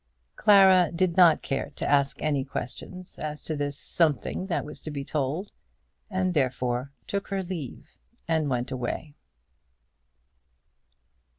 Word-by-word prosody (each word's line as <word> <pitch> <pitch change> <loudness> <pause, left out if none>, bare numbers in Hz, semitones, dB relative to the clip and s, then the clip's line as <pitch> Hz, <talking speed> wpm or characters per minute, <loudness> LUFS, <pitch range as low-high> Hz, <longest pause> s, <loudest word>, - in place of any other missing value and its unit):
Clara 190 -4 +6
did 170 0 +1
not 175 -4 +6
care 135 - -2
to - - -3
ask 140 -1 +2
any 145 -3 +1
questions 140 +8 -7
as 150 -1 -4
to 155 - -3
this 145 -1 -2
something 160 - 0
that 175 - -1
was 150 - -9
to - - -6
be 140 -2 -5
told, 150 +8 -2 0.6
and 185 -2 0
therefore 130 -2 0
took 200 0 -3
her 195 -1 -2
leave 155 -6 -7 0.3
and 160 -3 +1
went 125 -1 -1
away. 130 +4 -4
155 Hz, 130 wpm, -27 LUFS, 135-185 Hz, 0.6 s, Clara